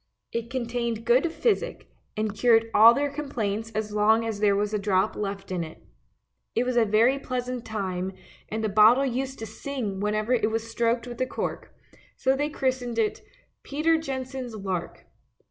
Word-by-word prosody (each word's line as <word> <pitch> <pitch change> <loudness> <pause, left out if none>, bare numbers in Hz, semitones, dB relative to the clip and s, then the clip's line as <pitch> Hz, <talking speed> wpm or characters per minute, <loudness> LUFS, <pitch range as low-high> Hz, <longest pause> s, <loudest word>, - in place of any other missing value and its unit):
It 230 0 -3
contained 235 -2 -2
good 260 +8 +3
physic, 470 +6 -1 0.3
and 215 -1 -1
cured 225 0 +4
all 230 +2 +8
their 285 +1 0
complaints 225 -7 -3
as 215 -1 -2
long 220 +2 +3
as 220 -3 -3
there 205 -1 +3
was 205 +1 -1
a 210 - +1
drop 200 0 +1
left 195 -1 -4
in 180 -2 -1
it. 160 0 -9 0.8
It 235 - +3
was 250 0 -1
a 235 -2 +4
very 230 +6 +3
pleasant 250 -2 -4
time, 190 -3 -3 0.4
and 220 +1 -3
the - - +2
bottle 220 +6 +6
used 265 +1 -2
to 225 - -6
sing 220 -3 -4
whenever 215 +3 0
it 225 -3 +2
was 225 0 -2
stroked 235 +1 +1
with 245 0 -7
a 255 - +1
cork, - - -5 0.4
so 265 +1 +2
they 290 +2 -1
christened 255 -4 -2
it 220 -2 0 0.2
" - - -41
Peter 310 +3 +1
Jensen's 260 -4 -5
lark." 190 -4 -4
230 Hz, 180 wpm, -26 LUFS, 210-255 Hz, 0.8 s, all